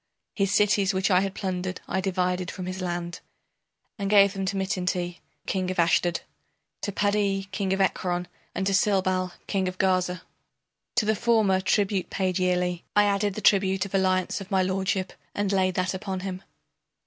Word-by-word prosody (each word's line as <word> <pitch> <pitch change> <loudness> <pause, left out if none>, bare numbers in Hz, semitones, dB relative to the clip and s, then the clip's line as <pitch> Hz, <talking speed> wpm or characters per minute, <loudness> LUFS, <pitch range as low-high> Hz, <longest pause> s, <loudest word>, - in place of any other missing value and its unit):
His 195 -2 0
cities 205 -2 +3
which 190 +2 +1
I 180 - +6
had 195 0 -2
plundered 185 -2 -3
I 190 - -1
divided 180 -1 -1
from 185 - -6
his 185 +1 -5
land 175 -1 -3 0.8
And 200 -1 -1
gave 200 -1 +6
them 195 -1 -3
to 195 +1 -1
Mitinti, 180 -2 -2 0.3
king 185 -2 -1
of 185 - -3
Ashdod, 170 0 +2 0.6
To 205 - -2
Padi, 200 -1 +1
king 190 0 -2
of 190 - +1
Ekron, 180 -2 0 0.3
and 190 - -1
to 195 - +1
Silbal, 185 -2 +1
king 190 -2 0
of 185 0 -4
Gaza. 185 -2 +1 0.7
To 220 - +2
the 220 +1 +2
former 210 -4 +3
tribute 200 -1 +1
paid 185 -1 -1
yearly 180 -1 0
I 205 - +6
added 200 -1 +1
the 215 - -4
tribute 190 -1 +3
of 200 - -9
alliance 185 0 +1
of 195 - -9
my 190 -2 +2
lordship 190 0 -1 0.2
and 205 -1 0
Laid 185 -2 +2
that 185 +1 0
upon 190 -1 -4
him. 185 -1 -5
190 Hz, 175 wpm, -26 LUFS, 185-195 Hz, 0.8 s, I